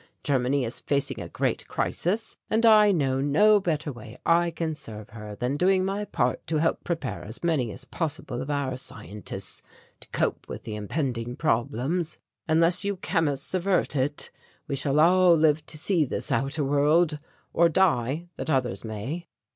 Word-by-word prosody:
Germany 135 -1 +1
is 115 - -4
facing 140 -1 -1
a - - -7
great - - -1
crisis, 215 +6 -1
and 225 +2 +2
I 215 -2 +7
know 135 -7 +1
no 205 +10 +5
better 155 -5 -1
way 120 -1 -11
I 170 +1 +4
can 165 -1 -3
serve 110 -7 -8
her 105 -2 -8
than 125 +6 -1
doing 185 +2 +3
my 200 +2 -2
part - - -1
to 160 - 0
help 165 +2 +1
prepare 160 -7 -3
as 110 +8 -8
many 150 -9 +1
as 130 - -8
possible 145 -5 -4
of 135 - -6
our 140 -3 -1
scientists 105 -6 -7 0.4
to - - -15
cope - - -1
with - - -6
the 110 - -5
impending 120 +2 -2
problems. 150 +5 -1 0.3
Unless 165 +4 +3
you 200 0 -1
chemists 160 -7 -1
avert 185 -3 +1
it, 140 +2 -1 0.4
we 140 - -1
shall 140 +2 +1
all 180 +2 +6
live 155 -1 +3
to 155 - -6
see 170 +1 +2
this 135 - -3
outer 140 +3 0
world, 150 +3 +3 0.3
or 170 0 +5
die 155 -4 +2
that - - -4
others 130 -5 0
may." 115 +11 -5
150 Hz, 170 wpm, -26 LUFS, 130-170 Hz, 0.4 s, I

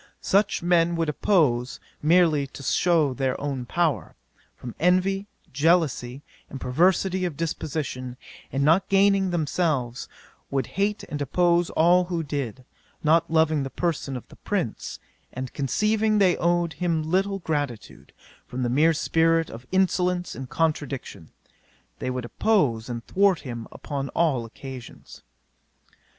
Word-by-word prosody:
Such 200 -2 +2
men 170 -1 +3
would 165 -2 0
oppose, 140 - +1 0.2
merely 155 -3 +3
to 140 - -11
shew 160 -3 +2
their 130 0 -1 0.3
power, 160 - -1 0.4
from 120 -2 -8
envy, 185 +3 +2 0.3
jealousy, 145 -4 +1 0.3
and 135 - -7
perversity 185 +8 +2
of 170 -6 -3
disposition; 140 -6 -4 0.3
and 135 +1 0
not 165 +6 +3
gaining 195 -1 +4
themselves, 155 -7 -1 0.4
would 135 -3 0
hate 205 +2 0
and 145 -1 -5
oppose 175 +4 +2
all 175 +3 +4
who 175 -2 -2
did: 135 -4 -4 0.4
not 165 +2 +3
loving 160 -2 +3
the 135 - -3
person 145 -5 -2
of 125 - -11
the - - -15
prince, - - -3 0.3
and 130 0 -6
conceiving 215 - +1
they 190 -4 +4
owed 170 -1 +1
him 165 -1 -1
little 190 +5 0
gratitude, 145 - -4 0.4
from 125 +1 -4
the 120 - 0
mere 155 +6 +4
spirit 165 +1 +2
of 120 +3 -10
insolence 180 -1 +1
and 130 -1 -7
contradiction, 140 - -2 0.7
they - - -3
would 125 -1 -3
oppose 130 - +1
and 120 -1 -5
thwart 195 -2 +2
him 120 -4 -7
upon 140 -2 -5
all 140 -9 +1
occasions." 125 +1 -10
160 Hz, 135 wpm, -25 LUFS, 135-180 Hz, 0.7 s, gaining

